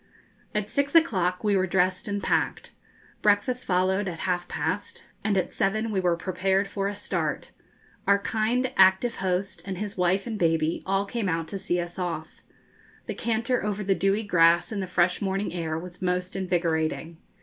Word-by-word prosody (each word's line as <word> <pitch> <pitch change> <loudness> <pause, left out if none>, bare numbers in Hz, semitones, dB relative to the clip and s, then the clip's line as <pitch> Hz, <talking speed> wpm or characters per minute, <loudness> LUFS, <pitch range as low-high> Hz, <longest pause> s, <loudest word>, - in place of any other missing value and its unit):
At 210 -1 0
six 280 +6 -1
o'clock 185 - +3
we 205 -2 +3
were 190 0 +2
dressed 185 +1 +1
and 205 -1 -2
packed. - - 0 0.5
Breakfast 210 +5 +2
followed 190 +2 +2
at 165 -3 -5
half 175 -1 -1
past, 465 0 -3 0.2
and 205 -2 +1
at 185 - -1
seven 215 +3 0
we 195 - +1
were 175 -2 +2
prepared 190 +3 0
for 195 0 -2
a 205 - -3
start. - - -3 0.6
Our 200 - +6
kind, 225 +5 0
active 190 +5 +5
host, 190 +1 -2
and 190 -2 -5
his 205 +1 -4
wife 180 +2 +2
and 225 -3 -4
baby, 165 -1 +1
all 195 +1 +1
came 215 -2 -2
out 165 -1 -1
to 195 - -4
see 175 -1 0
us 175 +2 -5
off. 170 -3 -4 0.6
The - - -3
canter 235 +2 0
over 210 0 -2
the 195 0 +2
dewy 195 +3 +1
grass, 170 -3 +4
in 210 - -2
the 190 - -3
fresh 180 0 +2
morning 195 0 -1
air, 160 -3 -2
was 175 +2 -9
most 180 0 -1
invigorating. 165 -3 -1
190 Hz, 180 wpm, -26 LUFS, 180-205 Hz, 0.6 s, Our